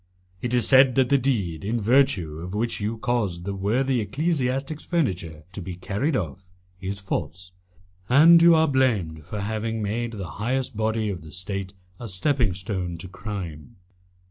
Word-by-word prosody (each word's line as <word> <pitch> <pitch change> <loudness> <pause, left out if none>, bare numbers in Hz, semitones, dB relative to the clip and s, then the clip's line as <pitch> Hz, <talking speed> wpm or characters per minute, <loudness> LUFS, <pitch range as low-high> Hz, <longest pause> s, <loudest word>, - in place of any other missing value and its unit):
It 120 - -2
is 120 -3 +3
said 130 -1 +6
that 130 -2 +3
the 140 - +5
deed, 100 - -1
in 115 +4 -1
virtue 100 - +2
of 90 +4 -6
which 115 0 -1
you 110 +2 -2
caused 105 -7 -1
the 100 - -2
worthy 120 +6 +1
ecclesiastic's 135 - -1
furniture 90 - -2
to 100 - -6
be 90 0 -6
carried 105 - -1
off, 90 - -4 0.3
is 95 +1 -4
false, 90 -1 -4 0.6
and 165 +6 +8
you 170 0 +7
are 160 0 +4
blamed 110 - +1
for 100 +6 -5
having 110 +2 -2
made 115 +3 -2
the 100 -4 -5 0.2
highest 130 +2 -1
body 110 0 0
of 90 -4 -6
the 80 - -12
State 95 +1 -5 0.2
a 120 - -6
stepping 115 +2 +1
stone 95 -2 -3
to 90 - -7
crime. 90 -7 -7
105 Hz, 170 wpm, -25 LUFS, 95-130 Hz, 0.6 s, and